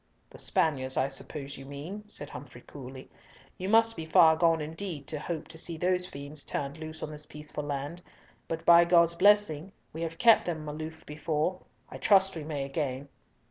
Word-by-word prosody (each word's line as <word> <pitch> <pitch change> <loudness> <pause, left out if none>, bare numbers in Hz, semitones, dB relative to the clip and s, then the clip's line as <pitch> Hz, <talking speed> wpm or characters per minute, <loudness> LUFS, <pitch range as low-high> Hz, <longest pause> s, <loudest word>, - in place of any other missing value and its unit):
"The - - -9
Spaniards, 130 -4 +2
I 130 +1 +2
suppose 135 +1 -6
you 135 - -10
mean," 165 +10 -7
said 145 -8 -4
Humfrey 125 -3 -10
coolly. 130 -1 -10 0.5
"You 185 +1 -3
must 225 +1 +4
be 160 - -6
far 160 0 +6
gone 165 0 +3
indeed 160 0 -5
to 150 - -2
hope 160 0 -5
to 160 -1 -5
see 165 0 -3
those 180 +1 +1
fiends 145 -3 -6
turned 140 +2 -4
loose 155 0 -7
on 155 - -5
this 150 0 -5
peaceful 150 0 -6
land, 145 +4 -4 0.5
but 165 0 -4
by 170 0 +8
God's 170 -1 +4
blessing 195 -3 +3 0.2
we 160 - -6
have 165 0 -4
kept 230 -2 +6
them 155 -3 -3
aloof 155 +2 -7
before, 155 +4 -2 0.3
I - - -9
trust 195 -2 +4
we 160 - -5
may 145 -2 -3
again." 135 -1 -3
155 Hz, 185 wpm, -29 LUFS, 145-170 Hz, 0.5 s, by